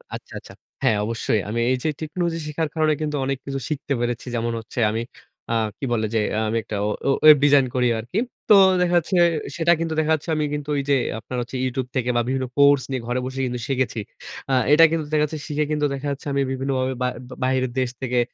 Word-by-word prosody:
আচ্ছা, -, -, -11 dB
আচ্ছা। -, -, -15 dB, 0.3 s
হ্যাঁ, 105 Hz, -, +3 dB
অবশ্যই। 115 Hz, -1 st, 0 dB
আমি 115 Hz, +2 st, -2 dB
এইযে 130 Hz, +5 st, 0 dB
টেকনোলজি 165 Hz, +1 st, -2 dB
শেখার 155 Hz, +1 st, -2 dB
কারণে 155 Hz, -1 st, +2 dB
কিন্তু 150 Hz, -1 st, -2 dB
অনেক 135 Hz, -1 st, -1 dB
কিছু 135 Hz, 0 st, -3 dB
শিখতে 145 Hz, -1 st, -2 dB
পেরেছি। 120 Hz, 0 st, -2 dB
যেমন 115 Hz, 0 st, -1 dB
হচ্ছে 115 Hz, +2 st, -7 dB
আমি 115 Hz, +1 st, -2 dB, 0.5 s
আ -, -, +1 dB, 0.2 s
কি 135 Hz, -, -4 dB
বলে 110 Hz, -1 st, 0 dB
যে -, -, +3 dB, 0.3 s
আমি 115 Hz, +1 st, 0 dB
একটা 110 Hz, -, -6 dB
ও -, -, 0 dB, 0.3 s
ওয়েব 155 Hz, -1 st, +9 dB
ডিজাইন 140 Hz, -2 st, +5 dB
করি 125 Hz, -1 st, +3 dB
আরকি। 120 Hz, -, -3 dB, 0.3 s
তো -, -, +10 dB, 0.3 s
দেখা 175 Hz, 0 st, +2 dB
যাচ্ছে 175 Hz, +3 st, 0 dB, 0.4 s
সেটা 170 Hz, +1 st, +3 dB
কিন্তু 165 Hz, -1 st, -2 dB
দেখা 155 Hz, 0 st, +1 dB
যাচ্ছে 155 Hz, +2 st, -8 dB
আমি 150 Hz, -1 st, 0 dB
কিন্তু 145 Hz, 0 st, -4 dB
ওইযে 140 Hz, 0 st, +1 dB, 0.2 s
আপনার 125 Hz, +3 st, -6 dB
হচ্ছে 125 Hz, +2 st, -7 dB
YouTube 130 Hz, 0 st, -3 dB
থেকে 125 Hz, -1 st, 0 dB
বা, 120 Hz, -, +3 dB
বিভিন্ন 130 Hz, -1 st, -1 dB
কোর্স 140 Hz, -1 st, +6 dB
নিয়ে 130 Hz, -2 st, -2 dB
ঘরে 125 Hz, +1 st, 0 dB
বসে 130 Hz, +1 st, -5 dB
কিন্তু 125 Hz, -1 st, -3 dB
শিখেছি। 130 Hz, -4 st, -1 dB, 0.5 s
আ -, -, +2 dB, 0.2 s
এটা 165 Hz, +2 st, +7 dB
কিন্তু 160 Hz, -2 st, -1 dB
দেখা 150 Hz, 0 st, +3 dB
যাচ্ছে 155 Hz, +1 st, -6 dB
শিখে 150 Hz, 0 st, 0 dB
কিন্তু 150 Hz, -1 st, +1 dB
দেখা 140 Hz, +1 st, -4 dB
যাচ্ছে 140 Hz, +1 st, -6 dB
আমি 140 Hz, -, +1 dB
বিভিন্নভাবে 130 Hz, 0 st, -1 dB
বা 125 Hz, -, +2 dB, 0.4 s
বাহিরের 130 Hz, -1 st, +1 dB
দেশ 130 Hz, -1 st, 0 dB
থেকে 125 Hz, -1 st, 0 dB
135 Hz, 215 wpm, -23 LUFS, 125-150 Hz, 0.5 s, তো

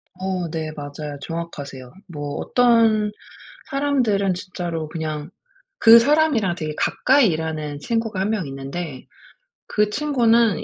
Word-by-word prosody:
어 185 Hz, -2 st, -3 dB
네. 155 Hz, -1 st, -4 dB
맞아요. 145 Hz, 0 st, -7 dB
정확하세요. 145 Hz, -6 st, -6 dB, 0.2 s
뭐 145 Hz, -4 st, -5 dB
어떤 230 Hz, -4 st, +3 dB, 0.6 s
사람들은 255 Hz, -9 st, +1 dB
진짜로 175 Hz, -3 st, -5 dB
그냥 155 Hz, -1 st, -5 dB, 0.5 s
그 230 Hz, +1 st, +9 dB
사람이랑 275 Hz, -, +3 dB
되게 155 Hz, -2 st, -4 dB
가까이 265 Hz, -2 st, +3 dB
일하는 155 Hz, -3 st, -3 dB
친구가 225 Hz, +3 st, -2 dB
1 195 Hz, +2 st, 0 dB
명 210 Hz, -7 st, -1 dB
있는데 135 Hz, +1 st, -6 dB, 0.6 s
그 210 Hz, 0 st, +1 dB
친구는 235 Hz, -5 st, +2 dB
180 Hz, 260 characters per minute, -22 LUFS, 155-230 Hz, 0.6 s, 그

